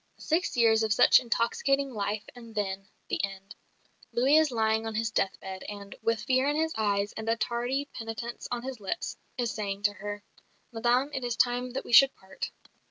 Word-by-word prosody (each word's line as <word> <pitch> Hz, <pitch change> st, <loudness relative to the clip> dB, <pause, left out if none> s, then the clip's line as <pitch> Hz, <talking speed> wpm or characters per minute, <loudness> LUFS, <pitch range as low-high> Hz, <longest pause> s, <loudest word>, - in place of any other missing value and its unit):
Six 325 Hz, -3 st, 0 dB
years 225 Hz, -2 st, +5 dB
of 220 Hz, -1 st, 0 dB
such -, -, +7 dB
intoxicating 265 Hz, +3 st, 0 dB
life 205 Hz, 0 st, -2 dB
and 230 Hz, -2 st, -12 dB
then 195 Hz, -1 st, -2 dB, 0.2 s
the -, -, -1 dB
end. 195 Hz, 0 st, -5 dB, 0.6 s
Louis 255 Hz, +6 st, +4 dB
is 315 Hz, -1 st, +4 dB
lying 220 Hz, -2 st, +1 dB
on 220 Hz, -, -4 dB
his 225 Hz, +1 st, 0 dB
death 195 Hz, -3 st, 0 dB
bed 190 Hz, 0 st, -7 dB
and, 200 Hz, -1 st, -8 dB
with 230 Hz, -1 st, 0 dB
fear 260 Hz, +2 st, +2 dB
in 295 Hz, -, 0 dB
his 320 Hz, +1 st, 0 dB
eyes 205 Hz, -1 st, 0 dB
and 220 Hz, 0 st, -4 dB
a 225 Hz, -, +3 dB
tardy 245 Hz, +4 st, -1 dB
penitence 225 Hz, +1 st, -6 dB
on 240 Hz, -1 st, -3 dB
his 260 Hz, -2 st, -5 dB
lips, 200 Hz, -, -4 dB, 0.2 s
is 240 Hz, -2 st, 0 dB
saying 200 Hz, -2 st, -4 dB
to 205 Hz, 0 st, +3 dB
her, 205 Hz, 0 st, -6 dB, 0.5 s
"Madame, 245 Hz, +4 st, +1 dB
it 265 Hz, -, -3 dB
is 240 Hz, -1 st, -1 dB
time 245 Hz, +1 st, +1 dB
that 270 Hz, -, -4 dB
we -, -, -6 dB
should 270 Hz, +3 st, +8 dB
part." 190 Hz, 0 st, -6 dB
230 Hz, 195 wpm, -29 LUFS, 205-250 Hz, 0.6 s, should